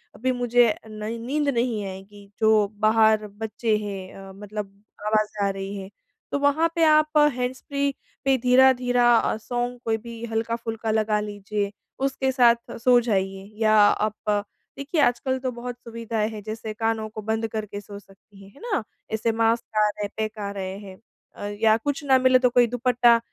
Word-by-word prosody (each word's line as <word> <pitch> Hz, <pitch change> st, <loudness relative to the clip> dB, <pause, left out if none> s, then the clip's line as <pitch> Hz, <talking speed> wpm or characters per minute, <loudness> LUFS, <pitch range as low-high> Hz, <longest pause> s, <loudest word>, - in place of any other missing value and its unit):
अभी 255 Hz, +3 st, 0 dB
मुझे 245 Hz, -2 st, +3 dB
नहीं 215 Hz, +1 st, -5 dB
नींद 285 Hz, +6 st, -1 dB
नहीं 235 Hz, -5 st, 0 dB
आएगी, 195 Hz, +1 st, -10 dB
जो 220 Hz, -2 st, +4 dB
बाहर 220 Hz, 0 st, +4 dB
बच्चे 220 Hz, +2 st, -2 dB
हैं 195 Hz, -3 st, -6 dB, 0.2 s
अ, -, -, -10 dB
मतलब 205 Hz, 0 st, -8 dB, 0.2 s
आवाज़ 215 Hz, 0 st, 0 dB
आ -, -, +2 dB
रही 195 Hz, +1 st, -5 dB
है। 190 Hz, -1 st, -7 dB, 0.4 s
तो 285 Hz, -, 0 dB
वहाँ 285 Hz, +4 st, +3 dB
पे 335 Hz, -, +2 dB
आप 305 Hz, 0 st, +4 dB, 0.2 s
हैंड्सफ्री 275 Hz, +3 st, -2 dB, 0.3 s
पे 270 Hz, -1 st, +4 dB
धीरे-धीरे 250 Hz, -1 st, +4 dB
अ, -, -, 0 dB
सॉन्ग 245 Hz, +2 st, -3 dB
कोई 225 Hz, -1 st, +1 dB
भी 230 Hz, +1 st, -9 dB
हल्का-फुल्का 225 Hz, 0 st, -2 dB
लगा 215 Hz, -1 st, +1 dB
लीजिए, 205 Hz, -1 st, -3 dB, 0.3 s
उसके 270 Hz, 0 st, 0 dB
साथ 240 Hz, -2 st, +2 dB
सो 245 Hz, +1 st, +5 dB
जाइए 195 Hz, -3 st, -2 dB
या 215 Hz, -1 st, +4 dB
आप 210 Hz, +1 st, +2 dB, 0.5 s
देखिए, 285 Hz, +4 st, -2 dB
आजकल 260 Hz, 0 st, +1 dB
तो 255 Hz, 0 st, -2 dB
बहुत 245 Hz, 0 st, -6 dB
सुविधाएँ 230 Hz, -2 st, -3 dB
हैं, 215 Hz, -2 st, -7 dB
जैसे 220 Hz, 0 st, -6 dB
कानों 225 Hz, 0 st, -1 dB
को 215 Hz, 0 st, -7 dB
बंद 220 Hz, +1 st, -1 dB
करके 215 Hz, -2 st, -5 dB
सो 205 Hz, 0 st, -10 dB
सकती 195 Hz, 0 st, -19 dB
हैं। 195 Hz, -, -14 dB
है -, -, -18 dB
ना? 450 Hz, -, -1 dB, 0.3 s
ऐसे 220 Hz, +1 st, +1 dB
मास्क 225 Hz, 0 st, 0 dB
आ 210 Hz, 0 st, +5 dB
रहे 210 Hz, 0 st, -5 dB
हैं, 205 Hz, -, -3 dB
पैक 215 Hz, 0 st, -3 dB
आ 200 Hz, -1 st, -3 dB
रहे 190 Hz, -1 st, -5 dB
हैं 195 Hz, -2 st, -11 dB, 0.4 s
अ, -, -, -7 dB, 0.2 s
या 220 Hz, -1 st, +5 dB
कुछ 285 Hz, +5 st, -3 dB
न 260 Hz, -1 st, +6 dB
मिले, 255 Hz, 0 st, +5 dB
तो 250 Hz, -1 st, +3 dB
कोई 245 Hz, -1 st, +4 dB
दुपट्टा, 240 Hz, 0 st, +3 dB
225 Hz, 175 wpm, -24 LUFS, 210-245 Hz, 0.5 s, न